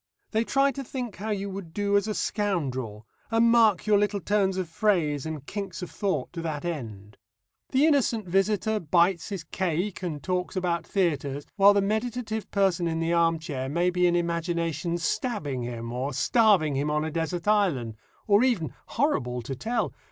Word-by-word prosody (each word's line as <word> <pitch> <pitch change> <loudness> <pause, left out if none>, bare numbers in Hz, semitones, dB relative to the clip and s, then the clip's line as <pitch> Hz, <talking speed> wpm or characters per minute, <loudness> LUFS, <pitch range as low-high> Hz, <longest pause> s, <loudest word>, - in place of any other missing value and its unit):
They 220 +1 +2
try 275 +3 +2
to 275 0 -6
think 245 -4 -5
how 215 +3 -5
you 200 -1 -2
would 190 -4 -8
do 205 0 +1
as 200 +1 +2
a 215 - -2
scoundrel, 130 - -2 0.2
and 230 +1 +4
mark 220 -6 +4
your 210 -1 +4
little 205 0 0
turns 195 -1 +1
of 185 -2 -2
phrase 165 - +1
and 155 -3 -6
kinks 195 -2 -5
of 180 - -7
thought 185 -10 -2
to 170 - -4
that 155 -1 -4
end. 110 - -6 0.5
The 270 +3 +3
innocent 260 -8 +2
visitor 205 +4 +1
bites 170 +2 +2
his 195 -5 -4
cake 180 +3 -2
and 160 -5 -4
talks 180 +1 -2
about 170 -3 -1
theatres, 145 -7 -1
while 200 0 +6
the 200 - +3
meditative 220 +1 -2
person 190 -4 +1
in 165 0 -1
the 165 +1 0
arm 165 -1 +3
chair 140 -5 -4
may 175 +4 +1
be 180 0 +3
in 175 - +2
imagination 170 0 -1
stabbing 165 - -2
him, 115 -1 -5
or 130 +3 -3
starving 200 - +3
him 145 +2 0
on 150 +1 0
a 160 - -3
desert 170 +3 -3
island, 175 - +2 0.3
or 205 +2 +4
even 185 - +1
horrible 125 - 0
to 135 +3 -5
tell! 230 - -2
180 Hz, 180 wpm, -27 LUFS, 155-210 Hz, 0.5 s, while